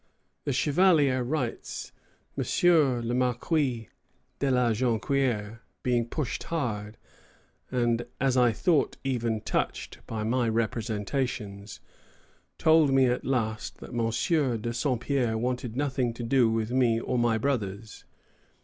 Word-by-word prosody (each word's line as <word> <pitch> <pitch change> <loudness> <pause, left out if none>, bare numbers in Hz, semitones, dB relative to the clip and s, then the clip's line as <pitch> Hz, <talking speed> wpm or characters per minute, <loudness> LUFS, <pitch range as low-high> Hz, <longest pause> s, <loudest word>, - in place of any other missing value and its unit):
The - - 0
Chevalier 145 -1 +3
writes: 125 -2 -3 0.4
"M. - - -1 0.6
le 120 - -1
Marquis 125 - 0 0.5
de 140 - +1
la 125 -2 +3
Jonquière, 115 -1 0 0.2
being 120 -2 +1
pushed 140 +1 -3
hard, 110 -9 -3 0.7
and 120 -1 0
as 135 -1 +2
I 125 -2 +5
thought 150 +6 +1
even 120 -5 -1
touched, - - -3
by 110 -2 -3
my 120 +1 +1
representations, 110 -1 -3 0.8
told 160 -3 +4
me 135 -1 +5
at 125 0 0
last 110 -5 -2
that - - -11
M. 120 +3 +1
de 115 +2 -3
Saint 125 -2 -1
Pierre 120 -5 0
wanted 125 0 -2
nothing 130 -4 0
to 120 - -6
do 120 0 +3
with 110 0 -1
me 125 -3 +3
or 125 +1 -1
my 120 -1 +2
brothers." 110 -4 -3
120 Hz, 125 wpm, -27 LUFS, 115-135 Hz, 0.8 s, I